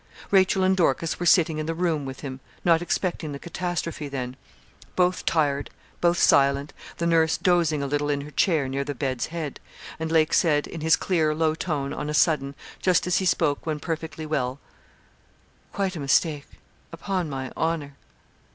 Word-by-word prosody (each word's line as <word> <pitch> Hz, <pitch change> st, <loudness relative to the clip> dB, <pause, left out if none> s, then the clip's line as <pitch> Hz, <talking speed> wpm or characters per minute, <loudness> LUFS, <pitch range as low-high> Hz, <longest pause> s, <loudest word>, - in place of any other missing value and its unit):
Rachel 190 Hz, -1 st, +4 dB
and 190 Hz, 0 st, +3 dB
Dorcas 165 Hz, -2 st, +1 dB
were 175 Hz, -, 0 dB
sitting 165 Hz, -3 st, +4 dB
in 155 Hz, -, -3 dB
the 165 Hz, -, -2 dB
room 165 Hz, -4 st, 0 dB
with 130 Hz, -1 st, -7 dB
him 130 Hz, -2 st, -6 dB, 0.3 s
not 165 Hz, -1 st, +4 dB
expecting 175 Hz, -3 st, -2 dB
the -, -, -5 dB
catastrophe 170 Hz, -2 st, -4 dB
then. 130 Hz, -2 st, -5 dB, 0.6 s
Both 180 Hz, 0 st, +1 dB
tired; 145 Hz, -3 st, +1 dB, 0.3 s
both 175 Hz, 0 st, +3 dB
silent; 140 Hz, -1 st, +3 dB, 0.2 s
the 170 Hz, -, -2 dB
nurse 165 Hz, -1 st, +3 dB
dozing 170 Hz, -5 st, +2 dB
a -, -, -1 dB
little 145 Hz, +1 st, -1 dB
in 145 Hz, -1 st, 0 dB
her 150 Hz, +1 st, -9 dB
chair, 155 Hz, -5 st, +2 dB
near 135 Hz, +1 st, -2 dB
the 145 Hz, 0 st, -5 dB
bed's 130 Hz, -2 st, -2 dB
head; 160 Hz, -4 st, -5 dB, 0.4 s
and 160 Hz, 0 st, -3 dB
Lake 160 Hz, -1 st, +3 dB
said, 150 Hz, -3 st, +3 dB
in 165 Hz, -, -8 dB
his 160 Hz, 0 st, +5 dB
clear, 160 Hz, -5 st, +1 dB
low 160 Hz, 0 st, +2 dB
tone, 150 Hz, -4 st, -3 dB
on 150 Hz, -, -4 dB
a 150 Hz, -, -1 dB
sudden, 140 Hz, -4 st, +2 dB, 0.3 s
just 185 Hz, -2 st, +3 dB
as 180 Hz, 0 st, +2 dB
he 190 Hz, -, -2 dB
spoke 150 Hz, -5 st, +1 dB
when 155 Hz, -1 st, -1 dB
perfectly 160 Hz, 0 st, -4 dB
well 135 Hz, -3 st, -2 dB, 1.1 s
'Quite 195 Hz, -2 st, -2 dB
a -, -, -5 dB
mistake, 145 Hz, +1 st, +1 dB, 0.4 s
upon 175 Hz, 0 st, -3 dB
my 135 Hz, -2 st, -5 dB
honour.' 160 Hz, -4 st, -2 dB
155 Hz, 180 wpm, -25 LUFS, 145-170 Hz, 1.1 s, his